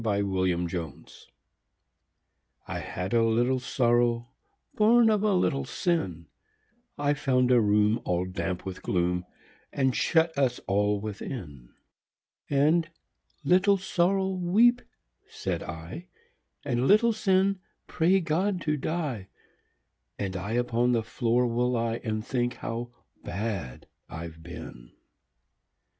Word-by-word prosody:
63 100 -2 +1 0.3
The 85 - -1
Penitent 85 -3 -6 1.4
I - - -4
had 90 +3 -5
a 115 -1 +4
little 120 +3 +2
Sorrow, 120 -1 +1 0.4
Born 225 +1 +5
of 210 -2 +2
a 210 -2 +2
little 140 -6 +1
Sin, 130 - -2 0.7
I 145 0 +1
found 125 -3 +1
a 125 -2 +6
room 105 +1 +3
all 90 0 0
damp 90 0 -4
with 95 -1 -6
gloom 90 0 0 0.5
And 130 -2 +1
shut 160 -1 +2
us 130 -3 +1
all 105 +1 +1
within; 100 - -7 0.8
And, 155 +4 +3 0.5
"Little 185 +6 +4
Sorrow, 190 +1 +1
weep," 200 +7 +3 0.5
said - - -3
I, 85 - -8 0.6
"And, 125 -1 0
Little 230 +3 +5
Sin, 195 -1 +2 0.3
pray 180 +3 +2
God 180 +4 0
to 150 -1 0
die, 145 - -3 0.9
And 95 -2 -3
I 95 +4 -4
upon 120 0 +1
the 115 -2 +1
floor 120 +2 +1
will 120 +1 +1
lie 115 -1 -1
And 110 0 -3
think 120 -1 -1
how 115 +2 -5 0.3
bad 95 - -4 0.2
I've 80 0 -8
been!" 70 -8 -10
120 Hz, 120 wpm, -27 LUFS, 100-165 Hz, 1.4 s, a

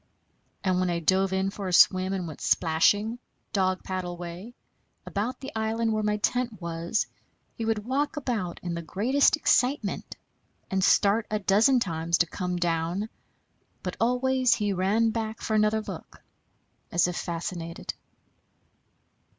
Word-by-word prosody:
And 185 -1 +2
when 185 -1 +1
I 170 - 0
dove 190 +3 +2
in 190 +1 0
for 200 -1 -5
a 180 - -2
swim 185 +2 +5
and 190 -2 -2
went 155 - -9
splashing, 205 +8 +2 0.3
dog 185 -2 +1
paddle 180 -2 -4
way, 175 +7 -8 0.5
about 225 +6 -3
the 270 +1 -6
island 220 +1 0
where 215 - 0
my 210 0 +1
tent 240 -1 -1
was, 170 +4 -1 0.5
he 230 - -4
would 220 -2 -1
walk 280 +4 -1
about 225 -11 -2
in 175 -1 -3
the 170 - -3
greatest 245 - +2
excitement, 250 -7 +1 0.6
and 190 -1 +1
start 205 +3 +4
a 215 - 0
dozen 210 +6 +4
times 170 -4 0
to 170 - +3
come 180 +2 -3
down; 175 +4 -1 0.7
but - - -3
always 255 +1 +3
he 205 -2 0
ran 205 +5 +2
back 220 0 -3
for 220 - -3
another 215 +1 +3
look, - - -9 0.7
as 175 - +3
if 180 - -3
fascinated. 170 -1 -4
200 Hz, 150 wpm, -27 LUFS, 175-225 Hz, 0.7 s, swim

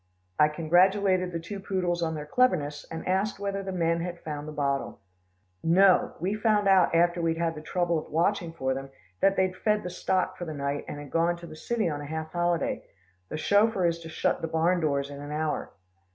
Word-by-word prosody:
I 150 - +7
congratulated 185 +4 +3
the 170 - -3
two 195 +5 -7
poodles 180 -3 -1
on 160 -1 -1
their 150 -1 -5
cleverness, 150 - +1
and 165 - -6
asked 190 +3 0
whether 200 0 -3
the 195 0 -5
men 170 -2 +1
had 175 0 -5
found 150 -1 -5
the - - -5
bottle. 140 -2 -2 0.6
"No. 185 +3 +4
We 185 +5 -1
found 215 -1 +2
out 190 -3 +5
after 175 +1 +3
we'd 165 -1 0
had 165 -1 0
the 155 - -8
trouble 175 0 0
of - - -11
watching 170 +2 +1
for 130 -5 -1
them, 135 +1 -6 0.3
that 195 - +3
they'd 185 -1 +1
fed 210 +2 +1
the 180 - -5
stock 185 +1 -1
for 175 - -4
the 155 -2 -5
night, 140 0 -2
and - - -6
had 145 -1 -9
gone 170 +1 +2
to 170 - -10
the 155 - -10
city 220 +6 -1
on 145 -3 -3
a 145 - -7
half 160 +1 -5
holiday. 175 - 0 0.5
The - - -4
chauffeur 205 +2 +3
is 170 0 +1
to 165 -1 -9
shut 160 - 0
the 165 - -2
barn 165 +3 +2
doors 140 -3 0
in 140 0 -8
an 145 0 -7
hour." 155 0 -2
170 Hz, 220 wpm, -27 LUFS, 155-190 Hz, 0.6 s, I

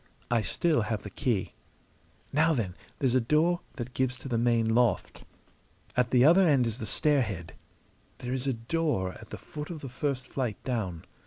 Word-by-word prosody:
I 120 -2 +3
still 155 +4 +1
have 110 0 -2
the 100 - -7
key. 105 -3 -1 0.8
Now, 160 +2 +4
then, 100 -8 -1 0.2
there's 130 -4 +1
a 130 - +4
door 155 +8 +2
that 125 -1 -6
gives 130 0 0
to 130 - -9
the 120 - -1
main 115 -1 +2
loft. 120 0 +1 0.7
At 125 -1 +2
the 125 0 +5
other 175 +5 +7
end 140 -8 +4
is 115 +1 -3
the 110 - -4
stairhead. 110 - 0 0.7
There 125 0 -4
is 130 +1 -2
a 135 - +2
door 115 - -1
at 110 - -13
the - - -6
foot 150 -3 -8
of 165 -4 -6
the 135 - -6
first 130 0 -2
flight 125 -6 -2
down. 100 -10 -3
125 Hz, 185 wpm, -29 LUFS, 115-145 Hz, 0.8 s, other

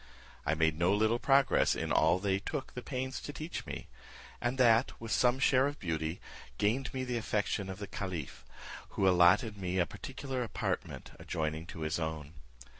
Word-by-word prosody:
I - - +3
made 80 0 +1
no 85 +2 +3
little 110 +3 +2
progress 135 +1 +4
in - - -3
all 80 +3 +4
they 95 0 0
took 130 +7 -5
the 125 - -5
pains 130 0 -4
to - - -6
teach 155 +3 -6
me; - - -5 0.6
and 120 +2 -1
that, 120 -1 +4
with 115 -1 -6
some 125 +5 +3
share 130 0 +4
of 145 +1 -4
beauty, 80 -2 -2 0.4
gained 120 +6 +1
me 130 -1 -3
the 125 -1 -2
affection 105 -2 -1
of 95 - -5
the 105 - -5
caliph, 90 -8 -5 0.5
who 95 - +3
allotted 95 +4 +5
me 90 -1 -2
a 90 - +3
particular 135 +3 -5
apartment 120 - -3
adjoining 80 +1 -3
to 80 - -8
his 80 +2 -1
own. 80 -2 -4
105 Hz, 180 wpm, -32 LUFS, 85-125 Hz, 0.6 s, allotted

